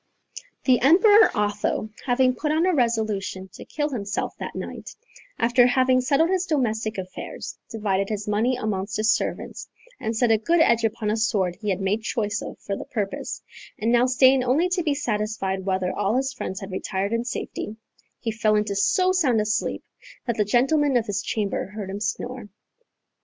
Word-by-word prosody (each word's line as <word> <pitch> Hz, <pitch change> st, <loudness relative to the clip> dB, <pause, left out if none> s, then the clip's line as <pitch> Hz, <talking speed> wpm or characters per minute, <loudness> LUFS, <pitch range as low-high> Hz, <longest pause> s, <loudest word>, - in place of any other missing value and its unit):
The 255 Hz, -2 st, +4 dB
Emperor 410 Hz, -, +6 dB
Otho, 210 Hz, +1 st, -1 dB, 0.2 s
having 255 Hz, +1 st, +3 dB
put 300 Hz, +4 st, -2 dB
on 320 Hz, +3 st, +2 dB
a 370 Hz, -, +2 dB
resolution 215 Hz, -, -1 dB
to -, -, -10 dB
kill 295 Hz, -1 st, -2 dB
himself 205 Hz, -7 st, -3 dB
that -, -, -6 dB
night, -, -, -7 dB, 0.4 s
after 240 Hz, +1 st, +4 dB
having 255 Hz, 0 st, +3 dB
settled 295 Hz, +7 st, +2 dB
his 375 Hz, 0 st, 0 dB
domestic 220 Hz, -7 st, -1 dB
affairs, 185 Hz, -1 st, -7 dB
divided 200 Hz, -3 st, -1 dB
his 210 Hz, -1 st, -4 dB
money 220 Hz, +5 st, +1 dB
amongst 200 Hz, -4 st, -3 dB
his 215 Hz, +1 st, +3 dB
servants, -, -, -3 dB, 0.3 s
and 220 Hz, 0 st, -2 dB
set 240 Hz, -1 st, +3 dB
a 220 Hz, -, +4 dB
good 335 Hz, +10 st, +2 dB
edge 235 Hz, -7 st, +4 dB
upon 220 Hz, -1 st, 0 dB
a 220 Hz, -, 0 dB
sword 200 Hz, -6 st, +1 dB
he 210 Hz, 0 st, -4 dB
had 190 Hz, -1 st, 0 dB
made 200 Hz, +3 st, 0 dB
choice 215 Hz, -2 st, -2 dB
of -, -, -7 dB
for 200 Hz, -, -4 dB
the -, -, -7 dB
purpose, 205 Hz, -4 st, -4 dB, 0.3 s
and 225 Hz, +2 st, 0 dB
now 240 Hz, +1 st, +4 dB
staying 260 Hz, +1 st, +5 dB
only 285 Hz, +9 st, +2 dB
to 365 Hz, 0 st, 0 dB
be 300 Hz, -4 st, 0 dB
satisfied 210 Hz, -6 st, -2 dB
whether 185 Hz, -1 st, 0 dB
all 205 Hz, +2 st, 0 dB
his 265 Hz, +1 st, 0 dB
friends 190 Hz, -6 st, -5 dB
had 195 Hz, 0 st, -7 dB
retired 195 Hz, +2 st, -2 dB
in 230 Hz, 0 st, 0 dB
safety, 225 Hz, -3 st, -5 dB, 0.4 s
he 225 Hz, -, -2 dB
fell 215 Hz, -1 st, +1 dB
into 210 Hz, -1 st, 0 dB
so 365 Hz, -, +3 dB
sound 285 Hz, -12 st, +2 dB
a 210 Hz, -, 0 dB
sleep 215 Hz, +1 st, -1 dB, 0.4 s
that 235 Hz, -, -1 dB
the 210 Hz, -, +2 dB
gentlemen 270 Hz, +5 st, +3 dB
of 230 Hz, -, 0 dB
his 205 Hz, -1 st, -2 dB
chamber 205 Hz, -2 st, -2 dB
heard 200 Hz, -1 st, -6 dB
him 200 Hz, -, -5 dB
snore. 235 Hz, +2 st, -4 dB
225 Hz, 185 wpm, -24 LUFS, 205-255 Hz, 0.4 s, Emperor